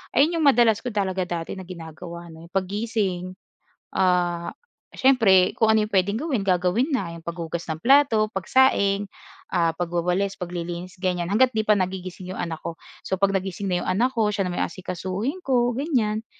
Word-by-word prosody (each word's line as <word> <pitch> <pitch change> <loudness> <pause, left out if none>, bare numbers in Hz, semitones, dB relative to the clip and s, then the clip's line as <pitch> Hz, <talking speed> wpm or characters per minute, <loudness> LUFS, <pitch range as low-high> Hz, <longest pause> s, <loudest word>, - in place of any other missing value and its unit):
Ayun 330 +4 +3
yung 310 - +3
madalas 235 -5 +5
ko 245 -2 -6
talaga 190 -2 -1
dati 170 +2 -4
na 185 - -9
ginagawa 170 0 -9
'no. 160 +1 -12
Paggising, 195 -2 -2 0.6
ah, 175 -2 +1 0.4
siyempre 215 -9 +4
kung 220 - +2
ano 220 -1 +4
yung 215 - -12
puwedeng 200 +2 +2
gawin, 275 -4 -1
gagawin 185 - +1
na, 195 - -2
yung 170 - -10
paghugas 170 0 -5
ng 160 - -2
plato, 240 - +4
pagsaing, 200 -1 +2 0.5
ah, 170 -1 +3
pagwawalis, 180 +3 0
paglilinis, 175 +1 -5
ganyan. 180 -2 -1
Hangga't 250 +5 +3
'di 220 - +1
pa 215 -1 +3
nagigising 185 0 -4
yung - - -4
anak 165 -2 -3
ko. - - -3 0.3
So, - - -3
'pag 200 - +5
nagising 190 +1 -4
na 175 -1 0
yung - - -2
anak 245 +6 +1
ko, 210 -2 +2
siya 195 -3 -1
naman 175 - -2
yung - - -6
asikasuhin 190 - -4
ko, 245 -2 +1
ganyan. 230 -7 0
190 Hz, 175 wpm, -24 LUFS, 175-225 Hz, 0.6 s, madalas